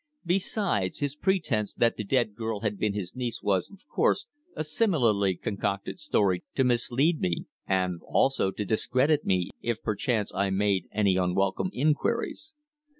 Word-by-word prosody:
Besides, 180 - 0
his 145 -1 -2
pretence 150 - 0
that 120 -1 +2
the 105 - -4
dead 115 0 +1
girl 110 -1 -3
had 105 -2 -2
been 105 -1 0
his 95 0 -4
niece 125 -3 -3
was, 100 -3 +1
of 200 +7 -18
course, 405 +4 +1 0.3
a - - -2
similarly 125 - +2
concocted 100 - -3
story 100 - +1
to 135 - +3
mislead 125 +6 +2
me, 85 -2 -1 0.2
and 90 -3 0
also 135 -7 +2
to 105 +2 -4
discredit 130 +8 +1
me 90 -2 +1
if 115 -2 -2
perchance 110 0 -1
I 100 0 +1
made 95 -2 +1
any 100 -3 +2
unwelcome 95 - +1
inquiries. 195 - -1
110 Hz, 150 wpm, -28 LUFS, 100-145 Hz, 0.3 s, to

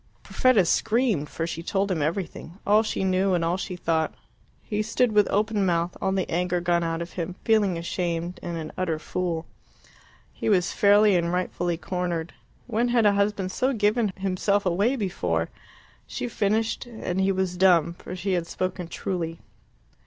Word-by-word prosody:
Perfetta 250 -8 +3
screamed 215 - +1
for 165 - -3
she 165 0 -4
told 195 +3 -1
him 165 -4 0
everything 170 +2 -3
all 210 +2 +5
she 215 -3 -2
knew 190 0 +2
and 170 -1 0
all 170 +2 +1
she 185 0 -4
thought. 165 -2 0 0.5
He 210 -2 -2
stood 225 +2 +1
with 210 -1 +4
open 210 0 +1
mouth, 170 -1 0
all 190 - +1
the 190 -1 0
anger 180 +1 0
gone 170 0 +1
out 165 0 -1
of 170 - -10
him, 175 0 -4
feeling 210 -5 +3
ashamed, 170 0 -3
and 170 -1 -4
an 155 -1 -5
utter 175 -4 -1
fool. 170 0 -3 0.9
He - - -2
was 185 -3 +3
fairly 205 0 +5
and 170 -1 +1
rightfully 175 -1 -1
cornered. 175 -1 -3 0.3
When 235 0 0
had 240 -2 +3
a 205 - +5
husband 200 -2 0
so 260 +7 +1
given 215 -1 +2
himself 195 +1 0
away 200 +9 +2
before? 90 - -1 0.6
She 120 - -4
finished; 220 - 0
and 190 -5 -3
he 195 +1 +3
was 190 -1 -1
dumb, 175 -3 +4
for 180 - -8
she 185 +1 -2
had 175 -2 -1
spoken 185 -1 -3
truly. 165 -1 -3
185 Hz, 175 wpm, -25 LUFS, 170-205 Hz, 0.9 s, all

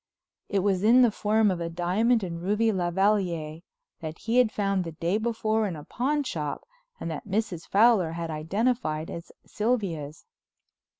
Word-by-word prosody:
It 195 -2 +1
was 195 -2 +1
in 245 +4 +6
the 240 - +4
form 215 0 +2
of 175 -2 -3
a 170 - -2
diamond 195 +7 +1
and 170 -2 -5
ruby 210 +5 +2
lavalliere 175 -4 0 0.4
that 160 -1 -6
he 230 +2 -1
had 240 -4 +4
found 195 -3 0
the 165 -2 -7
day 170 +6 -1
before 220 -1 0
in 180 - -4
a 150 - -9
pawn 285 - -1
shop 150 - -4 0.3
and 165 - -4
that 160 - -6
Mrs. 195 -5 -2
Fowler 200 -6 +4
had 165 -1 -4
identified 160 0 -1
as 170 0 -8
Sylvia's. 190 - -2
195 Hz, 165 wpm, -27 LUFS, 165-220 Hz, 0.4 s, in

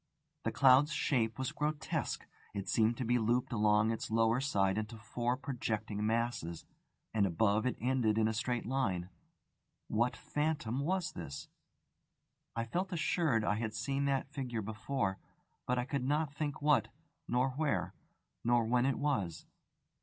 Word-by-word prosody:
The - - +1
cloud's 135 +3 +6
shape 115 -8 +1
was 130 -1 -2
grotesque. 150 0 -2 0.3
It 100 -1 -3
seemed 115 +1 +3
to 130 - -2
be 120 +1 +3
looped 120 +3 +1
along 105 0 +3
its 115 - -3
lower 115 +2 +3
side 100 -7 +2
into 110 +1 -5
four 120 +3 -1
projecting 110 -6 -3
masses, 110 -7 -1 0.5
and, 105 -3 +3
above, 105 +6 +2
it 125 - -1
ended 120 -3 +2
in 110 -1 +4
a 110 - 0
straight 120 +2 -1
line. 100 -8 -1 0.8
What 120 +1 +1
phantom 150 -5 -1
was 180 +4 0
it? 70 -5 -6 1.1
I 115 - 0
felt 180 - -2
assured 160 -8 +1
I 105 - +1
had 110 -2 -3
seen 140 +5 -1
that 135 0 0
figure 120 -6 -3
before; 105 -1 -2 0.5
but 125 - +1
I 125 - 0
could 140 -1 -2
not 145 +1 +1
think 145 -1 -3
what, 150 -2 +4 0.4
nor 125 +2 +2
where, 145 +2 -1 0.5
nor 120 -1 +3
when 125 +3 +3
it 135 - +1
was. 100 - -1
120 Hz, 155 wpm, -34 LUFS, 110-135 Hz, 1.1 s, cloud's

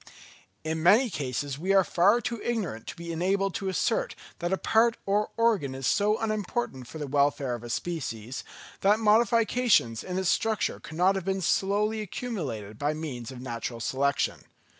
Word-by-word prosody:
In 160 0 -2
many 215 +8 +5
cases 140 -1 -3
we 190 +4 +1
are 190 - +6
far 200 +8 +3
too 230 0 -4
ignorant 195 - -3
to - - -6
be 170 0 -6
enabled 195 +3 0
to 195 - -2
assert - - 0 0.2
that 175 +1 -2
a 190 - +2
part 225 +3 +3
or 205 +2 +1
organ 210 - +2
is 135 0 -5
so 210 +7 +2
unimportant 215 - -2
for 160 - -9
the 150 - -4
welfare 140 -2 +1
of 120 -1 -6
a 120 - -7
species, 130 -5 -4 0.4
that 205 +2 +4
modifications 225 - +3
in 180 0 -4
its 190 -1 +1
structure 220 -2 0
could 160 - -10
not 185 +3 +4
have 190 -2 -4
been 195 0 0
slowly 205 +4 +1
accumulated 150 - -5
by 150 +2 0
means 135 -6 -5
of 125 -1 -9
natural 120 -1 -5
selection. 140 +4 0
180 Hz, 175 wpm, -27 LUFS, 140-210 Hz, 0.4 s, are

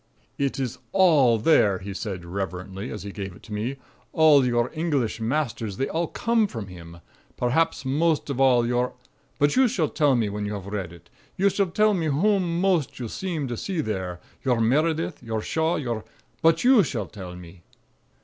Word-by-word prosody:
"It 140 -1 -1
is 125 -1 -3
all 155 -11 +5
there," 105 -6 +4
he 100 +2 -7
said 95 -4 -5
reverently, 95 +1 -5
as 105 - -6
he 100 - -6
gave 95 -2 -6
it - - -17
to 110 - -9
me. 115 +6 -2 0.4
"All 155 -3 +6
your 120 -1 +1
English 150 -9 -1
masters, 115 -5 -2
they 135 - 0
all 165 +1 -1
come 230 +2 +1
from 115 - -6
him. 85 -1 -11 0.4
Perhaps, 135 +4 +1
most 155 +4 +1
of 135 -1 -2
all, 125 -3 +5
your 125 +1 0 0.4
But 145 0 +2
you 260 0 +5
shall 175 - 0
tell 145 -4 +2
me 115 -3 +1
when 105 +1 -4
you 105 - -3
have 100 -2 -7
read 100 -4 -4
it. 85 -1 -16 0.3
You 200 +1 +3
shall 200 +1 +1
tell 210 +4 +3
me 170 -5 0
whom 175 +2 +1
most 180 -6 +1
you 120 - -4
seem 165 - -3
to 120 - -2
see 185 - -3
there. 95 - -3 0.2
Your 125 -3 +2
Meredith? 155 +8 +1
Your 110 -1 -3
Shaw? 160 +2 0
Your 120 -8 -3 0.4
But 165 0 +3
you 250 -3 +7
shall 120 - -2
tell 90 -2 -9
me." 90 0 -12
125 Hz, 190 wpm, -25 LUFS, 105-165 Hz, 0.4 s, you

